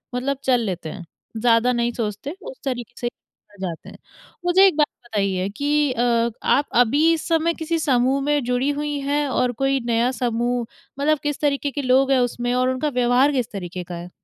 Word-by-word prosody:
मतलब 265 Hz, +2 st, -1 dB
चल 250 Hz, -2 st, +3 dB
लेते 175 Hz, -4 st, -4 dB
हैं 175 Hz, -1 st, -8 dB, 0.3 s
ज़्यादा 235 Hz, +1 st, +3 dB
नहीं 235 Hz, 0 st, 0 dB
सोचते 225 Hz, -, -4 dB
उस -, -, -9 dB
तरीके 245 Hz, -3 st, -4 dB
से 240 Hz, -, -2 dB
ही -, -, 0 dB, 0.4 s
आ -, -, -17 dB
जाते 165 Hz, -2 st, -8 dB
हैं। -, -, -13 dB, 0.5 s
मुझे 375 Hz, +2 st, +6 dB
एक 370 Hz, -, +1 dB
बात 300 Hz, -, +4 dB, 0.2 s
बताइए 195 Hz, -4 st, -1 dB
कि 290 Hz, 0 st, +1 dB
अ, 235 Hz, -1 st, +1 dB
आप 285 Hz, +3 st, +2 dB
अभी 285 Hz, +8 st, +4 dB
इस 325 Hz, -, -3 dB
समय 330 Hz, 0 st, +2 dB
किसी 330 Hz, 0 st, -2 dB
समूह 265 Hz, -1 st, +2 dB
में 290 Hz, -2 st, +1 dB
जुड़ी 250 Hz, +3 st, 0 dB
हुई 290 Hz, 0 st, -2 dB
हैं? 285 Hz, +1 st, 0 dB
और 250 Hz, -1 st, +1 dB
कोई 270 Hz, +3 st, 0 dB
नया 235 Hz, +1 st, +2 dB
समूह 240 Hz, -1 st, -1 dB, 0.3 s
मतलब 305 Hz, +1 st, +2 dB
किस 290 Hz, -1 st, -2 dB
तरीके 285 Hz, -1 st, 0 dB
के 285 Hz, -, -3 dB
लोग 265 Hz, +1 st, +3 dB
हैं 265 Hz, -, +4 dB
उसमें 245 Hz, 0 st, -1 dB
और 255 Hz, +1 st, +2 dB
उनका 260 Hz, +4 st, -1 dB
व्यवहार 250 Hz, +2 st, +3 dB
किस 250 Hz, -5 st, -1 dB
तरीके 180 Hz, -2 st, -6 dB
का 175 Hz, 0 st, -7 dB
है? 175 Hz, +1 st, -8 dB
255 Hz, 200 wpm, -22 LUFS, 235-290 Hz, 0.5 s, मुझे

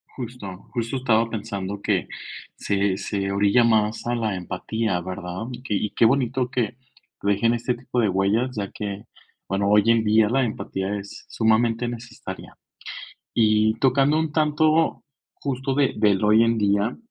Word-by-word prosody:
Justo, 110 Hz, -7 st, -8 dB
justo 120 Hz, +2 st, -2 dB
estaba 115 Hz, -3 st, +2 dB
pensando 100 Hz, -3 st, -5 dB
que, -, -, 0 dB, 0.5 s
se 100 Hz, -1 st, 0 dB
se 100 Hz, -1 st, -2 dB
orilla 100 Hz, +4 st, +4 dB
más 110 Hz, -1 st, +2 dB
a 120 Hz, 0 st, 0 dB
la 110 Hz, -4 st, -1 dB
empatía, 100 Hz, +2 st, -2 dB
¿verdad? 90 Hz, +1 st, -5 dB
Y 125 Hz, -, -8 dB
qué 120 Hz, -, -3 dB
y 105 Hz, +1 st, -1 dB
qué -, -, +1 dB
bonito 125 Hz, 0 st, +1 dB
que 125 Hz, -3 st, -1 dB, 0.5 s
dejen 100 Hz, +4 st, +2 dB
este 120 Hz, +1 st, -1 dB
tipo 125 Hz, 0 st, -3 dB
de 110 Hz, -, +2 dB
huellas, 100 Hz, +7 st, +1 dB
ya 100 Hz, -2 st, -3 dB
que, 105 Hz, +1 st, -6 dB, 0.4 s
bueno, 100 Hz, +1 st, 0 dB
hoy 105 Hz, 0 st, +5 dB
en 115 Hz, -1 st, +3 dB
día 110 Hz, 0 st, +4 dB
la 135 Hz, +3 st, +2 dB
empatía 100 Hz, -3 st, -3 dB
es 100 Hz, -, -11 dB
sumamente 115 Hz, +1 st, +2 dB
necesaria. 120 Hz, 0 st, -8 dB, 0.8 s
Y 110 Hz, -1 st, +3 dB
tocando 135 Hz, +4 st, +3 dB
un 160 Hz, -1 st, -1 dB
tanto 155 Hz, +1 st, +2 dB, 0.3 s
justo 135 Hz, -1 st, -3 dB
de 140 Hz, -2 st, +2 dB
del 105 Hz, -2 st, +2 dB
hoy 110 Hz, +2 st, +5 dB
en 115 Hz, 0 st, +1 dB
día, 100 Hz, +2 st, +1 dB
110 Hz, 160 wpm, -23 LUFS, 100-125 Hz, 0.8 s, hoy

